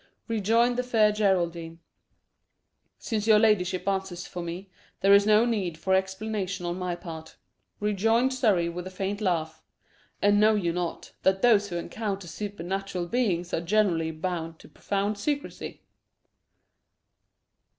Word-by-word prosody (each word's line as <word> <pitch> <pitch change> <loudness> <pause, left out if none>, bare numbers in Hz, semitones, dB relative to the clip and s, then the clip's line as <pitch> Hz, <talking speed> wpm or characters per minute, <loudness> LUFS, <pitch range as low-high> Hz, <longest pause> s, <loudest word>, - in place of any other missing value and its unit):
rejoined 230 +2 +2
the - - +2
Fair 225 -4 +3
Geraldine. 170 -5 0 1.2
"Since 220 -2 -3
your 215 -1 +7
ladyship 200 -4 +2
answers 190 -2 -2
for 180 - -6
me, 175 +3 -7 0.3
there 195 +1 +6
is 200 +1 +6
no 215 +2 +5
need 195 -9 -1
for 190 +3 0
explanation 190 0 -1
on 175 +1 -3
my 180 -1 -2
part," 160 -3 -9 0.4
rejoined 225 +5 +2
Surrey, 210 -10 +2
with 175 +2 -5
a - - -5
faint 195 +2 -4
laugh. 160 -5 -1 0.6
"And 205 0 +4
know 215 +1 +5
you 175 -5 0
not, 175 -1 -4
that 190 0 +2
those 210 -4 +4
who 175 - -5
encounter 200 0 -4
super 205 +1 -6
natural 190 0 -3
beings 180 -5 -1
are - - 0
generally 170 -3 +1
bound 165 0 -4
to - - -14
profound 205 +1 -2
secrecy?" 285 +5 -4
195 Hz, 140 wpm, -27 LUFS, 175-215 Hz, 1.2 s, your